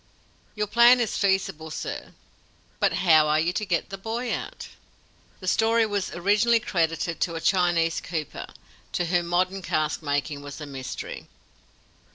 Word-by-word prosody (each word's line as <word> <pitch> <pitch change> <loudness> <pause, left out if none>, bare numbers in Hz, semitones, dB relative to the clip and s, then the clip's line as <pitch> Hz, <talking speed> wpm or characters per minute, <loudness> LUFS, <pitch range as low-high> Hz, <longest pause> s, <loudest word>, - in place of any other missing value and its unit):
"Your 210 -1 0
plan 235 +4 +6
is 230 -3 -1
feasible, 190 -5 0
sir; 155 - -6 0.7
but - - +3
how 160 -4 +4
are 155 +1 +3
you 170 +3 0
to 215 - -2
get 175 +1 -1
the 195 - -6
boy 230 +4 -3
out?" - - -6 0.7
(The 185 - -7
story 225 +3 +3
was 205 -3 -2
originally 210 +6 +3
credited 165 -5 -1
to 170 - 0
a - - -2
Chinese 170 -2 +2
cooper, 160 -4 -5 0.5
to 175 - 0
whom 175 0 0
modern 185 +2 0
caskmaking 150 -3 -1
was 145 +1 -8
a 150 - -6
mystery.) 135 -2 -7
175 Hz, 150 wpm, -25 LUFS, 160-205 Hz, 0.7 s, plan